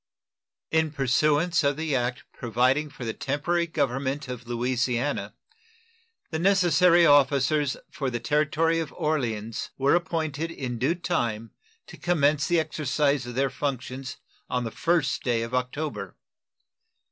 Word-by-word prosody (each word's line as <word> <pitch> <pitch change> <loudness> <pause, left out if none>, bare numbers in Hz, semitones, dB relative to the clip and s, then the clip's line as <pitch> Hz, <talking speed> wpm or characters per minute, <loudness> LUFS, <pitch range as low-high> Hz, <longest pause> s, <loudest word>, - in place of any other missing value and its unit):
In 160 0 +2
pursuance 150 +5 +2
of 140 0 +1
the 155 -3 -1
act 125 0 -1
providing 125 +6 +1
for 130 -3 -8
the 110 - -2
temporary 170 +5 -1
government 140 -2 -1
of 125 -1 -7
Louisiana, 125 +2 -1 1.0
the 160 - -2
necessary 180 -2 +5
officers 145 0 +3
for 135 -3 -2
the 120 -1 -3
Territory 155 +5 +1
of 160 -3 -4
Orleans 115 -8 -2
were 135 +1 +3
appointed 165 -3 -1
in 130 -7 -5
due 140 +8 +1
time 115 -11 -2 0.3
to - - -12
commence 150 -4 +2
the 175 -1 +3
exercise 145 -3 0
of 120 - -7
their 135 0 +1
functions 130 -1 -4 0.3
on 125 -1 -1
the 115 - -4
first 165 0 0
day 120 -2 0
of 115 +2 -6
October. 130 +4 -3
140 Hz, 135 wpm, -26 LUFS, 125-160 Hz, 1.0 s, necessary